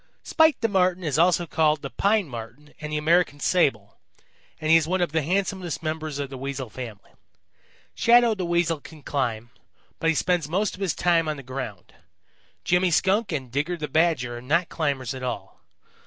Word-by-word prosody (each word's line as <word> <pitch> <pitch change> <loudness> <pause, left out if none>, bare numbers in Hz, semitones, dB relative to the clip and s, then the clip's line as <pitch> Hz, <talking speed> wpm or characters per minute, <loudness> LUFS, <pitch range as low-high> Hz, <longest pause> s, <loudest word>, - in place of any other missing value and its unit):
"Spite 320 -3 +3
the 225 - +3
Marten 185 -3 +1
is 155 -2 0
also 175 0 +3
called 155 -2 +1
the 140 - -5
Pine 205 -2 +1
Marten 125 +4 -9
and 150 0 -5
the 150 - -1
American 160 -1 +2
Sable, 135 - +1 0.6
and 155 0 0
he - - +8
is 160 -1 +4
one 185 +2 0
of 175 -4 0
the 160 0 +1
handsomest 185 +1 -2
members 155 -2 -3
of 140 -1 -4
the 135 - -7
Weasel 135 -3 -5
family. 115 -6 -9 0.8
Shadow 235 -1 +5
the 190 -3 -4
Weasel 170 -2 +1
can 155 -1 -13
climb, 120 -5 -2 0.5
but 165 - +1
he 165 - +2
spends 175 -2 0
most 195 +5 0
of 195 - -11
his 190 -4 0
time 165 -2 +2
on 155 - -3
the 140 - -9
ground. 130 -6 -7 0.7
Jimmy 180 +1 +2
Skunk 195 +5 +2
and 135 -6 -4
Digger 150 +7 -1
the 150 -2 -4
Badger 150 -8 +1
are - - -12
not 165 +7 +1
climbers 140 -6 -2
at 130 - -7
all. 125 -1 -5
155 Hz, 190 wpm, -25 LUFS, 135-180 Hz, 0.8 s, he